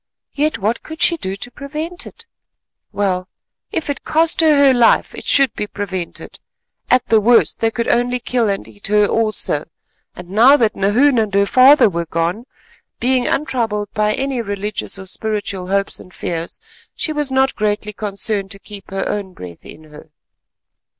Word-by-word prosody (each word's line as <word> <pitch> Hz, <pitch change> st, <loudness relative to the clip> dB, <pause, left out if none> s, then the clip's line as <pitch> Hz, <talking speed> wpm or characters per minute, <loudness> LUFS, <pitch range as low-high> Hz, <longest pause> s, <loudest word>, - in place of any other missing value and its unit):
Yet 305 Hz, +2 st, 0 dB
what 220 Hz, +4 st, -1 dB
could 315 Hz, 0 st, -10 dB
she 340 Hz, -, +4 dB
do 190 Hz, -, -4 dB
to 245 Hz, +5 st, -8 dB
prevent 310 Hz, +6 st, -5 dB
it? 460 Hz, -, -13 dB, 0.7 s
Well, 190 Hz, -3 st, -1 dB, 0.4 s
if 320 Hz, -, -3 dB
it 285 Hz, -2 st, -3 dB
cost 325 Hz, +1 st, +2 dB
her 315 Hz, -2 st, +5 dB
her 280 Hz, -2 st, +5 dB
life, 240 Hz, -2 st, +3 dB
it -, -, -9 dB
should 275 Hz, -2 st, +4 dB
be 210 Hz, -, -4 dB
prevented. 190 Hz, -4 st, -6 dB, 0.5 s
At 250 Hz, -1 st, +3 dB
the 220 Hz, -1 st, +3 dB
worst 235 Hz, +3 st, +3 dB
they 225 Hz, -, +2 dB
could 235 Hz, +1 st, -3 dB
only 245 Hz, +1 st, +1 dB
kill 240 Hz, -2 st, 0 dB
and 195 Hz, 0 st, -3 dB
eat 205 Hz, -, -5 dB
her 210 Hz, 0 st, +4 dB
also, 215 Hz, +1 st, 0 dB, 0.5 s
and 180 Hz, -1 st, -11 dB
now 245 Hz, +8 st, +6 dB
that 225 Hz, -5 st, +1 dB
Nahoon 235 Hz, +7 st, +3 dB
and 215 Hz, -2 st, 0 dB
her 200 Hz, 0 st, +4 dB
father 260 Hz, +4 st, +6 dB
were 170 Hz, -3 st, -3 dB
gone, 170 Hz, +8 st, -2 dB, 0.5 s
being 250 Hz, 0 st, +1 dB
untroubled 225 Hz, -8 st, -1 dB
by 215 Hz, -1 st, +1 dB
any 270 Hz, -2 st, -2 dB
religious 205 Hz, -1 st, -3 dB
or 190 Hz, -, -9 dB
spiritual 200 Hz, -2 st, -3 dB
hopes 195 Hz, +1 st, 0 dB
and 185 Hz, -, -14 dB
fears, 170 Hz, -1 st, -5 dB, 0.4 s
she 310 Hz, -, -2 dB
was 295 Hz, -2 st, -1 dB
not 265 Hz, 0 st, +1 dB
greatly 210 Hz, 0 st, -1 dB
concerned 200 Hz, -1 st, -3 dB
to -, -, -11 dB
keep 200 Hz, -1 st, -10 dB
her 195 Hz, 0 st, -3 dB
own 200 Hz, -3 st, -4 dB
breath 90 Hz, -, -11 dB
in 155 Hz, -, -12 dB
her. 150 Hz, +1 st, -14 dB
215 Hz, 175 wpm, -18 LUFS, 200-260 Hz, 0.7 s, now